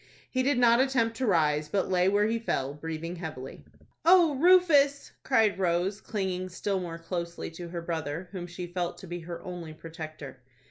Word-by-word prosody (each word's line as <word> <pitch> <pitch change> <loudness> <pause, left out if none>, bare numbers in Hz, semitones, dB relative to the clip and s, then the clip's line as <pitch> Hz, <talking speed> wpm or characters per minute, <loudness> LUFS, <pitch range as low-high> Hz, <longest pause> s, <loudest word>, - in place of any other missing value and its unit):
He 255 - +1
did 270 0 +2
not 235 -1 +5
attempt 240 -4 +1
to 255 - -1
rise, 150 -5 +2
but 195 +1 0
lay 180 0 +3
where 205 +1 +3
he 230 +1 0
fell, 140 -11 -2
breathing 160 +3 -5
heavily. 155 -6 -7 0.4
"O 340 -3 +6
Rufus!" 290 -3 +4
cried 220 -6 +2
Rose, 185 +2 0
clinging 185 -3 -3
still 195 +2 -2
more 170 -2 -5
closely 170 0 -5
to 170 +1 -8
her 170 -1 -5
brother, 165 0 -4
whom 180 -3 -6
she 175 +1 -6
felt 175 0 -3
to - - -10
be 175 +1 -5
her 170 0 -7
only 175 -3 -7
protector. 155 -4 -9
180 Hz, 180 wpm, -28 LUFS, 165-225 Hz, 0.4 s, O